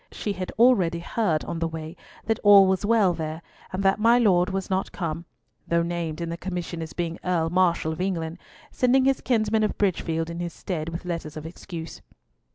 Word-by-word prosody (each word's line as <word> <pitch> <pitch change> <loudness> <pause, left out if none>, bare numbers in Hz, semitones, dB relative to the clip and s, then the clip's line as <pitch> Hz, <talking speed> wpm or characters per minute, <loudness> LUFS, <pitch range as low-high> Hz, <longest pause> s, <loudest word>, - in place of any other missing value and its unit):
She 205 - -3
had 185 -1 -5
already 200 -8 +4
heard 170 -2 -1
on 170 -1 -4
the 165 - 0
way 160 0 -7 0.3
that 225 -1 0
all 200 -1 +8
was 190 +1 +1
well 210 -4 +3
there, 160 0 -5 0.3
and 190 +1 -3
that 195 +1 +3
my 230 +2 +5
Lord 185 -6 +3
was 190 -1 -3
not 190 0 -1
come, 170 -2 -4 0.4
though 170 0 +2
named 170 -2 -3
in 170 - -3
the 170 - -4
commission 175 -2 -5
as 160 - -6
being 170 -1 -4
Earl 165 -3 0
Marshal 175 -3 +2
of 160 - -6
England, 170 -3 -2 0.3
sending 260 +1 +3
his 270 -1 +2
kinsman 220 -3 +1
of 215 - 0
Bridgefield 165 -4 0
in 170 - -6
his 175 -1 -4
stead 165 -4 -4
with 170 +2 -6
letters 165 -3 -4
of 155 - -7
excuse. 165 -1 -8
175 Hz, 200 wpm, -25 LUFS, 165-200 Hz, 0.4 s, all